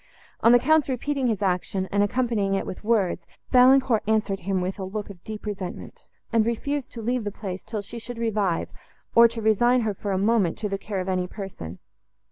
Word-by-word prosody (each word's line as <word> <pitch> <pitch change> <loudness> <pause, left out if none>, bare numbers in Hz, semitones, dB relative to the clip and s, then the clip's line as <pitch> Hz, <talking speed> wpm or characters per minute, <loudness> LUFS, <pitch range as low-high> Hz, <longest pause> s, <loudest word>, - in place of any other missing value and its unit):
On 230 - +5
the 245 - +8
Count's 305 +3 +3
repeating 270 +1 -1
his 215 -3 -1
action, 185 0 -1
and 200 - +2
accompanying 205 -2 +1
it 195 - -1
with 185 - -7
words, 205 -6 +1 0.2
Valancourt 255 -2 +5
answered 215 -3 +1
him 190 +1 -1
with 185 +2 -3
a - - -3
look 205 +2 -5
of 180 -3 -15
deep 215 0 -7
resentment, 195 -4 -6 0.3
and 225 -1 +4
refused 260 +4 -2
to 230 - -6
leave 245 +1 0
the 205 - -2
place, 190 -2 -6
till 220 -1 -4
she 235 +4 -7
should 245 +1 -7
revive, 210 -6 0 0.4
or 235 0 +8
to 225 -1 -6
resign 240 +4 +4
her 220 -2 -1
for 200 +1 -4
a 190 - +1
moment 200 -3 +2
to 215 - -2
the 195 -1 -3
care 195 -2 -3
of 185 - -6
any 185 -1 0
person. 180 - -8
215 Hz, 210 wpm, -25 LUFS, 195-235 Hz, 0.4 s, the